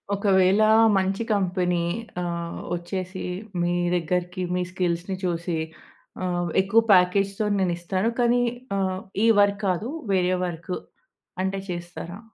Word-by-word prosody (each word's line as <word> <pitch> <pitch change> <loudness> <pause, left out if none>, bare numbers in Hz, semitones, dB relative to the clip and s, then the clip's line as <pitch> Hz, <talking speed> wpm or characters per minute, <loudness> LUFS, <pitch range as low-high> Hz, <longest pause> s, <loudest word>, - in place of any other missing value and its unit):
ఒకవేళ 195 0 +3 0.4
మంచి 195 +3 0
కంపెనీ 180 -3 +1 0.4
ఆహ్, 170 -1 -4 0.2
వచ్చేసి 185 +2 -5 0.4
మీ 175 0 +1 0.2
దగ్గరికి 180 +2 -1
మీ 180 - 0
స్కిల్స్‌ని 180 0 -2
చూసి 170 -1 -1 0.7
ఆహ్, 175 -1 -1
ఎక్కువ 210 +4 +4
ప్యాకేజ్‌తో 195 +3 +3
నేనిస్తాను. 185 +3 0
కానీ 240 0 +3 0.4
ఆహ్, 190 -1 -1 0.3
ఈ - - +5
వర్క్ 200 +1 +2
కాదు 185 +6 -1 0.2
వేరే 185 -1 +2
వర్కు 175 +1 -4 0.7
అంటే 195 +1 -1
చేస్తారా? 175 +1 -6
185 Hz, 110 wpm, -25 LUFS, 175-195 Hz, 0.7 s, ఈ